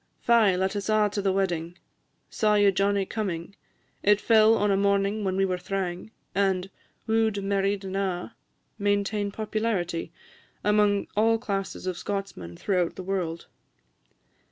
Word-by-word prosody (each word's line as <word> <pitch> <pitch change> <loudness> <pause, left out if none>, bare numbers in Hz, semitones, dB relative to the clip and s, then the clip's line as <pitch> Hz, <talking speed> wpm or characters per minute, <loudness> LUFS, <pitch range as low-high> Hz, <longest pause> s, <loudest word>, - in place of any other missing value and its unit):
"Fy, 225 -5 +4
let 190 +3 -1
us 200 0 -3
a' 215 -1 +3
to 205 - -2
the 195 -1 +1
wedding," 175 -3 -1 0.5
"Saw 210 -1 +1
ye 205 -1 +5
Johnnie 195 +1 +1
comin'?" 190 -4 -4 0.5
"It 205 0 +4
fell 220 0 +5
on 205 -1 +1
a - - +3
morning 200 +1 +1
when 190 -1 -1
we 195 0 +2
were 185 -1 -2
thrang," 180 0 -4 0.2
and 195 -1 0 0.3
"Woo'd, 220 -2 +1
and 195 -1 -3
married, 200 0 0
and 190 0 -5
a'," 185 -3 -2 0.5
maintain 205 0 0
popularity 205 -6 -2 0.5
among 210 -1 +3
all 225 +2 +3
classes 195 -5 -4
of 185 -2 -3
Scotsmen 195 - -5
throughout 180 -4 0
the 185 - -7
world. 175 -3 -3
195 Hz, 150 wpm, -26 LUFS, 185-210 Hz, 0.5 s, ye